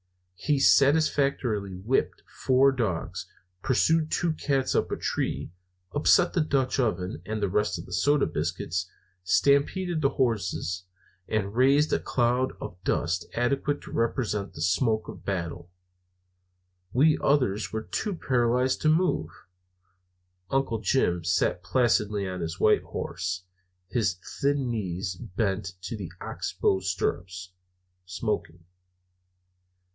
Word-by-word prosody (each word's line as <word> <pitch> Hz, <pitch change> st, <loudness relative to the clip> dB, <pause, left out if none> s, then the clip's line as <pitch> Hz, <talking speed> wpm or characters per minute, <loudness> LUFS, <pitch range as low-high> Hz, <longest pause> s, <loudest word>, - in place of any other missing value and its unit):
He 145 Hz, +10 st, 0 dB
satisfactorily 135 Hz, -, +3 dB
whipped 105 Hz, +9 st, -1 dB
four 135 Hz, +1 st, +3 dB
dogs, 110 Hz, -11 st, -3 dB, 0.3 s
pursued 155 Hz, +6 st, +2 dB
two 170 Hz, 0 st, 0 dB
cats 135 Hz, -4 st, 0 dB
up -, -, +1 dB
a -, -, -1 dB
tree, -, -, -2 dB, 0.4 s
upset 155 Hz, +4 st, +4 dB
the 175 Hz, -, +2 dB
Dutch 135 Hz, -3 st, 0 dB
oven 90 Hz, -, -1 dB
and 110 Hz, 0 st, -2 dB
the -, -, +3 dB
rest 95 Hz, -1 st, 0 dB
of 85 Hz, -, -8 dB
the 90 Hz, -, -9 dB
soda 145 Hz, +10 st, +3 dB
biscuits, 90 Hz, +2 st, -2 dB, 0.3 s
stampeded 155 Hz, -, +2 dB
the 140 Hz, -, +3 dB
horses, 95 Hz, -8 st, -1 dB, 0.4 s
and 100 Hz, -2 st, -1 dB
raised 140 Hz, +5 st, +4 dB
a -, -, +3 dB
cloud 125 Hz, +1 st, +1 dB
of 90 Hz, +1 st, -8 dB
dust 90 Hz, 0 st, 0 dB
adequate 140 Hz, +4 st, 0 dB
to -, -, -11 dB
represent 115 Hz, -3 st, -1 dB
the 75 Hz, -, -4 dB
smoke 110 Hz, +5 st, +1 dB
of -, -, -9 dB
battle. 85 Hz, -2 st, -4 dB, 1.2 s
We 150 Hz, +7 st, +4 dB
others 125 Hz, -8 st, +1 dB
were 110 Hz, 0 st, -3 dB
too 205 Hz, -, -3 dB
paralyzed 125 Hz, -2 st, +1 dB
to 155 Hz, -, +3 dB
move. 160 Hz, -, +2 dB, 1.2 s
Uncle 135 Hz, -3 st, 0 dB
Jim 90 Hz, -5 st, +1 dB
sat 90 Hz, +1 st, +1 dB
placidly 105 Hz, -3 st, +1 dB
on 90 Hz, -1 st, -4 dB
his 85 Hz, +2 st, -4 dB
white 105 Hz, -, +4 dB
horse, 90 Hz, 0 st, -4 dB, 0.4 s
his 95 Hz, -5 st, 0 dB, 0.2 s
thin 140 Hz, -3 st, +1 dB
knees 95 Hz, -4 st, -3 dB
bent 95 Hz, +1 st, -3 dB
to 95 Hz, -, -4 dB
the 95 Hz, -6 st, -7 dB
ox -, -, -4 dB
bow 95 Hz, -, +3 dB
stirrups, 90 Hz, -1 st, -3 dB, 0.6 s
smoking. 85 Hz, -2 st, -3 dB
110 Hz, 125 wpm, -27 LUFS, 90-135 Hz, 1.2 s, upset